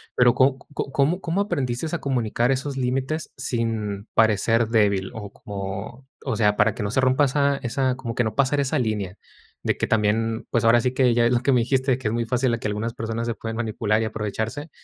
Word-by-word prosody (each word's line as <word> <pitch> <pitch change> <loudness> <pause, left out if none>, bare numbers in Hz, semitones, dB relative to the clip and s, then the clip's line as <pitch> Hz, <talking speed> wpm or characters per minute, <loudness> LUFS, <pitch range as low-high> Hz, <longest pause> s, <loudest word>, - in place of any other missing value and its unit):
Pero, 120 -1 +5
¿có 130 0 +3
c 145 - -21
có 135 - -3
cómo 155 +7 +2
cómo 175 +3 0
aprendiste 135 -7 -2
a - - -3
comunicar 120 -2 0
esos 135 +1 -2
límites 135 +5 -2
sin 115 -5 -2
parecer 110 +1 +3
débil? 100 -4 +2
O 105 -2 -7
como, 100 +6 -7 0.2
o 130 -5 -1
sea, 105 -1 +3
para - - +2
que 110 - -4
no 100 - -2
se 130 - +2
rompa 130 +3 +3
esa 140 +1 +1
esa 130 +2 0
como 120 -3 -5
que 125 - +2
no 110 -1 -3
pasar 140 +1 +2
esa 140 +2 0
línea 105 -5 -2 0.5
de - - +1
que - - -1
también, 110 +1 0
pues 120 - +1
ahora 115 +1 +6
sí 125 +1 0
que 130 -2 +3
ya 120 0 +3
ves 120 - +3
lo 120 - +2
que 135 - +2
me 125 - +4
dijiste, 130 +1 +1
que 130 - -3
es - - -3
muy 115 0 0
fácil 125 +1 +1
a 115 - -1
que - - -3
algunas 110 +3 -3
personas 115 +1 -3
se 115 - 0
pueden 115 0 -5
manipular 110 -1 0
y - - 0
aprovecharse. 110 +7 -4
120 Hz, 230 wpm, -23 LUFS, 110-130 Hz, 0.5 s, ahora